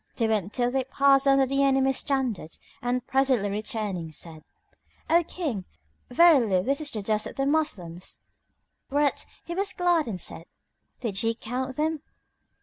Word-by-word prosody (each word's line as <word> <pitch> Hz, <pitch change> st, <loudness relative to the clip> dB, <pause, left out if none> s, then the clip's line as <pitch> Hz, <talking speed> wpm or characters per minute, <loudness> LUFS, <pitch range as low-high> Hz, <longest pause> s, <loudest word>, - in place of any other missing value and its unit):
They 230 Hz, -3 st, +1 dB
went 210 Hz, -3 st, 0 dB
till 245 Hz, 0 st, 0 dB
they 265 Hz, 0 st, 0 dB
passed 275 Hz, +1 st, +4 dB
under 275 Hz, 0 st, +5 dB
the 275 Hz, +1 st, 0 dB
enemy's 270 Hz, -1 st, +3 dB
standards 255 Hz, -, -2 dB, 0.2 s
and 245 Hz, 0 st, -1 dB
presently 260 Hz, -7 st, +1 dB
returning 205 Hz, -5 st, -3 dB
said, 155 Hz, 0 st, -8 dB, 0.7 s
"O 340 Hz, +1 st, +5 dB
King, 290 Hz, -, -4 dB, 0.4 s
verily 245 Hz, -, +5 dB
this 275 Hz, +6 st, 0 dB
is 300 Hz, -, -1 dB
the 215 Hz, -6 st, -5 dB
dust 215 Hz, +1 st, 0 dB
of -, -, -9 dB
the 275 Hz, -, 0 dB
Moslems." 190 Hz, -, -2 dB, 0.7 s
Whereat 285 Hz, 0 st, +1 dB, 0.2 s
he 340 Hz, -, -5 dB
was 390 Hz, +2 st, -1 dB
glad 350 Hz, -4 st, +2 dB
and 195 Hz, -5 st, -4 dB
said, 165 Hz, -, -3 dB, 0.6 s
"Did 210 Hz, -6 st, -1 dB
ye 225 Hz, 0 st, +1 dB
count 255 Hz, +3 st, -4 dB
them?" 310 Hz, +1 st, -1 dB
260 Hz, 155 wpm, -26 LUFS, 210-280 Hz, 0.7 s, under